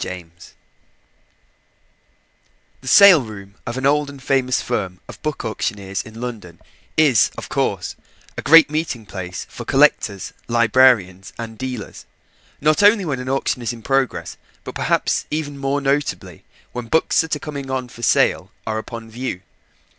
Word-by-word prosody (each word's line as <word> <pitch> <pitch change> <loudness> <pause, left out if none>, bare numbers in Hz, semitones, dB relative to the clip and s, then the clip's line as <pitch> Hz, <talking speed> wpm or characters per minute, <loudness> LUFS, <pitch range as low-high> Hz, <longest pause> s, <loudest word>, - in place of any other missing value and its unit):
POYNTER 85 -2 -9 2.3
The 130 - -12
sale 180 +4 +8
room 100 -4 -10
of 120 +2 -4
an 130 - -2
old 145 +1 +2
and 140 -1 -10
famous 130 -1 +1
firm 95 -7 -3
of - - -11
book 155 -5 -3
auctioneers 100 -3 -3
in 110 +1 -12
London 110 -9 -7 0.4
is, 145 -9 +5
of - - -7
course, - - -1 0.4
a - - -4
great 165 -1 +7
meeting 155 -8 -2
place 90 -2 -6
for - - -9
collectors, 100 -2 +2
librarians, 115 -5 +3 0.2
dealers: 125 -4 -6 0.5
not 155 +5 +3
only 205 -1 +5
when 140 -5 -2
an 125 0 -5
auction 135 -1 -1
is 120 -1 -2
in 115 -2 -12
progress, 135 -1 -1 0.3
but - - -7
perhaps - - 0
even 150 -2 -3
more 140 +1 -1
notably 140 0 -2 0.3
when 120 -1 -6
books 160 +6 +3
that 160 -1 -2
are 145 - -9
coming 140 -3 -5
on 130 -1 -2
for 120 0 -13
sale - - +2
are 110 0 -2
upon 115 0 -8
view. 115 -5 -5
125 Hz, 150 wpm, -20 LUFS, 110-140 Hz, 2.3 s, sale